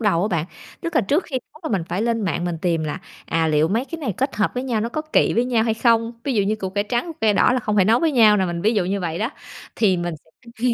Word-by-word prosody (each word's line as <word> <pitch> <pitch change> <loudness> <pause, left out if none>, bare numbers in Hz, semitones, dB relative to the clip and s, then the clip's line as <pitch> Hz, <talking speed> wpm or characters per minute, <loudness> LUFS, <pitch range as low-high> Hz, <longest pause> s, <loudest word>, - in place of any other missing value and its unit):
đầu 195 -6 +2
á 210 - +1
bạn. 170 -5 0 0.4
Tức 335 0 -4
là - - +5
trước 290 - +1
khi 265 -4 -3
nấu 305 - -17
là 195 - +2
mình - - -4
phải 190 +5 -1
lên 230 -1 0
mạng 175 -3 -1
mình 175 -2 -3
tìm 165 -3 0
là, 150 +4 -3 0.3
à, 165 -1 +1
liệu 155 +1 +2
mấy 230 +6 0
cái 330 +3 -7
này 250 -10 -2
kết 270 -2 -1
hợp 210 - +1
với 250 - -2
nhau 235 -5 -1
nó 230 - -1
có 310 +5 -3
kỵ 310 - +2
với 235 - +2
nhau 235 -3 +1
hay 225 -1 +1
không, 230 0 +2
ví 270 -3 -1
dụ 205 - +3
như 215 +2 0
củ 190 -3 -4
cải 205 +1 -1
trắng, 240 +8 -1
củ 335 - -5
cải 220 -2 +4
đỏ 250 - +4
là 255 - +1
không 210 -1 -1
thể 190 - +5
nấu 225 +4 +3
với 325 -3 +2
nhau 215 -4 +6
nè, 190 - +2
mình 175 -1 -3
ví 220 +2 +2
dụ 195 -4 +1
như 195 +2 -1
vậy 170 -2 -3
đó. 225 +5 -1 0.5
Thì 195 -5 +3
mình 175 -1 -3
sẽ 230 +8 -19
215 Hz, 320 wpm, -22 LUFS, 185-240 Hz, 0.5 s, nhau